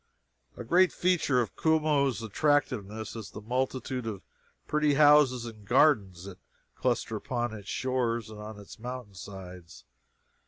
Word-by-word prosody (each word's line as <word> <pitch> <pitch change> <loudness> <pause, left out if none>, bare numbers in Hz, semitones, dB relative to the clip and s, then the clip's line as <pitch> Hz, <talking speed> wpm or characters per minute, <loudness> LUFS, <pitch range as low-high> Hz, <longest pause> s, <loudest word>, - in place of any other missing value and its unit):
A - - -6
great 180 +10 +4
feature 175 -8 +2
of 110 - -4
Como's 150 -7 +2
attractiveness 110 -4 0
is 110 -3 -7
the - - -9
multitude 130 +1 -2
of 100 -4 -5 0.4
pretty 150 -1 +2
houses 145 -4 +5
and 110 -3 -9
gardens 100 - +3
that 95 -2 -10 0.3
cluster - - -1
upon 120 -2 -3
its 105 -2 -9
shores 120 -4 -1
and 105 - -10
on 105 0 -8
its 100 +2 -12
mountain 125 -3 -7
sides. 90 -3 -10
120 Hz, 140 wpm, -29 LUFS, 105-140 Hz, 0.4 s, houses